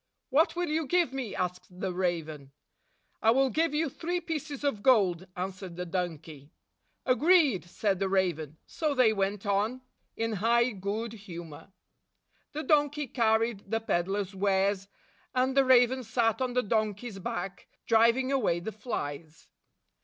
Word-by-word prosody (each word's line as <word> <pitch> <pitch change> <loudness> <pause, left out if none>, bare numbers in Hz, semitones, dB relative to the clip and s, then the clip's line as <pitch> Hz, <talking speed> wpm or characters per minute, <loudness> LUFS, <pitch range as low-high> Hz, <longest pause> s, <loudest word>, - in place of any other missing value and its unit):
"What 310 +7 +3
will 350 -1 -1
you 310 -1 -1
give 345 -6 +2
me?" 260 -6 -4
asked 180 0 -4
the 190 -1 -2
raven. 160 -6 -3 0.7
"I 220 - +4
will 265 +2 +4
give 325 +5 +1
you 320 +2 +1
three 345 +6 -3
pieces 310 -4 -5
of 275 -8 0
gold," 190 -8 +3
an 185 +1 -2
swered 185 -2 -10
the 180 +1 -4
donkey. 160 -5 -5 0.6
"Agreed," 280 - +4
said 190 +2 -1
the 195 -1 0
raven. 165 -6 0
So 310 -4 -2
they 245 -4 +4
went 200 0 -2
on 210 +6 0 0.3
67 225 0 -1
in 215 - -2
high 235 +4 +3
good 210 +3 -4
humor. 175 -5 -10 0.8
The 305 +2 -3
donkey 295 0 +2
carried 225 -4 0
the 225 +1 +1
peddler's 195 -1 -1
wares, 195 0 +1 0.5
and 260 +1 +1
the 275 -1 +5
raven 255 0 +5
sat 225 0 0
on 255 -1 -1
the 250 0 +1
don 215 -1 0
key's 205 -1 -8
back, 185 +1 -5 0.2
driving 235 +4 +3
away 230 -11 +1
the 195 +6 -5
flies. 160 - -6
220 Hz, 155 wpm, -29 LUFS, 185-260 Hz, 0.8 s, the